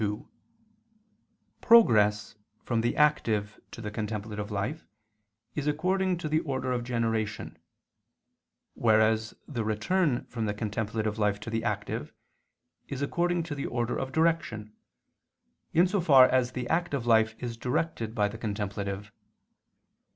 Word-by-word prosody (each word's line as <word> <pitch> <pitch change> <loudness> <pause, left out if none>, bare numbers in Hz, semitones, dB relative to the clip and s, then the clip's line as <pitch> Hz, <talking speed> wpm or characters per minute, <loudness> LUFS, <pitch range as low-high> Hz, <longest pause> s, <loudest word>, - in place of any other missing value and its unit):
2: 105 0 -2 1.3
Progress 105 - +5 0.3
from 115 -2 0
the 120 - -1
active 110 -9 +1
to - - -10
the 105 -1 -5
contemplative 105 -1 -4
life 105 +10 -3 0.7
is 150 -1 -3
according 185 +4 +1
to 165 - -4
the 155 +1 +2
order 130 -4 -3
of 120 -1 -1
generation; 115 -8 -2 1.2
whereas 110 0 +2
the 120 -6 -3
return 120 - 0
from 115 -3 -4
the 105 - -2
contemplative 110 0 -2
life 105 -1 +1
to 110 +2 -7
the 115 0 -1
active 105 -3 -3 0.8
is 140 0 -4
according 175 +3 0
to 160 -2 -5
the 140 -1 -4
order 120 0 -1
of 135 0 -3
direction, 145 -10 0 1.0
in 170 +2 +5
so 190 +1 0
far 135 -6 +7
as 125 -1 +1
the 125 -1 -4
active 165 -6 -1
life 110 -2 +3
is 120 -2 -5
directed 120 -2 -2
by 105 -2 +2
the 110 +2 -8
contemplative. 100 -2 -4
115 Hz, 135 wpm, -28 LUFS, 105-145 Hz, 1.3 s, far